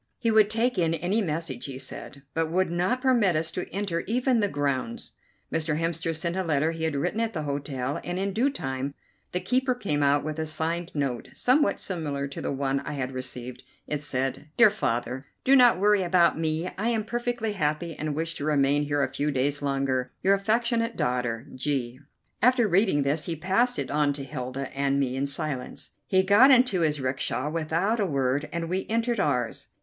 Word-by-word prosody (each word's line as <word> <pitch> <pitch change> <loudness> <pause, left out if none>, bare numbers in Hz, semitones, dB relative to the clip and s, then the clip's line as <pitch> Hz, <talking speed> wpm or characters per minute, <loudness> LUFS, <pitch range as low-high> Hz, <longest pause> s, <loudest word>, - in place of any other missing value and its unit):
He 230 - +1
would 215 -1 +5
take 230 0 +1
in 165 -1 +2
any 185 +7 0
message, 155 - -3
he 135 -2 -6
said, 135 +1 -7
but 165 0 0
would 185 +1 +1
not 185 +10 0
permit 235 -9 +3
us 160 +1 -1
to 180 - -4
enter 195 -3 -2
even 250 +1 +2
the 205 - +2
grounds. 140 -7 -2 0.4
Mr. 160 -1 0
Hemster 165 0 -1
sent 170 +2 -2
a 190 - 0
letter 155 -1 +1
he 165 -1 -3
had 160 -2 -1
written 175 +9 -1
at 225 -1 -1
the 155 -4 -3
hotel, 140 -2 -3
and 175 +1 -3
in 195 +1 -1
due 245 +7 +2
time 135 - -4 0.4
the 180 - 0
keeper 255 +4 +1
came 175 -12 -1
out 145 0 +3
with 155 +1 -4
a 160 - -2
signed 165 +2 -2
note, 135 -5 -2
somewhat 255 -3 +3
similar 145 -6 -3
to 140 - -7
the - - -2
one 135 0 0
I 150 - -6
had 135 -2 -3
received. 125 -1 -7 0.2
It 150 - -2
said: 135 0 -2
"DEAR 225 -3 +7
FATHER: 130 - -2 0.2
"Do 270 - +5
not 245 -5 +6
worry 205 +1 +4
about 175 -1 +4
me; 160 +2 -1
I 220 - 0
am 225 -2 0
perfectly 240 -1 -2
happy 155 -2 -1
and 150 -1 -3
wish 165 +2 -2
to - - -5
remain 145 -1 +2
here 145 -1 +1
a - - +2
few 145 +1 0
days 140 +1 0
longer. 135 -2 -1
"Your 195 - +5
affectionate 230 +3 +1
daughter, 125 -1 -1
"G." 130 -2 -2 0.4
After 245 0 +4
reading 190 -6 +3
this 145 +3 0
he 170 - -2
passed 195 +10 +1
it - - -3
on 145 -1 +2
to 140 -1 -5
Hilda 135 -1 -5
and 140 0 +1
me 130 -2 0
in 135 +1 -1
silence. 140 -2 -4 0.2
He 190 -1 +3
got 205 +8 +7
into 250 -8 +5
his 150 -2 +1
'rickshaw 130 +2 -1
without 165 +7 0
a 200 - +1
word, 140 0 0
and 170 -1 -3
we 185 +3 -2
entered 230 0 0
ours. 125 -9 -1
160 Hz, 200 wpm, -26 LUFS, 140-200 Hz, 0.4 s, DEAR